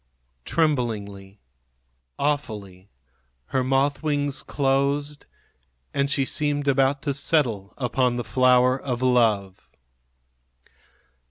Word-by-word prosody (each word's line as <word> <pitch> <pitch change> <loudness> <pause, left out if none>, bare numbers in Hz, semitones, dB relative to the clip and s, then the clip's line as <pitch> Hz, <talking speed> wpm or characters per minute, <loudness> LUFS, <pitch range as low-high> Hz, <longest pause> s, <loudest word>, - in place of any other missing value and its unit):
Tremblingly, 105 -10 -2 0.8
awfully, 105 -10 -3 0.6
her 130 - +2
moth 135 +2 +1
wings 145 -2 -1
closed, 140 +1 -1 0.7
and 140 0 0
she 140 -1 +1
seemed 145 0 -1
about 135 0 +2
to 145 -2 -1
settle 125 -9 0
upon 125 -1 0
the 120 - -3
flower 130 +1 +3
of 125 -2 -3
love. 110 -7 +1
130 Hz, 90 wpm, -24 LUFS, 120-145 Hz, 0.8 s, flower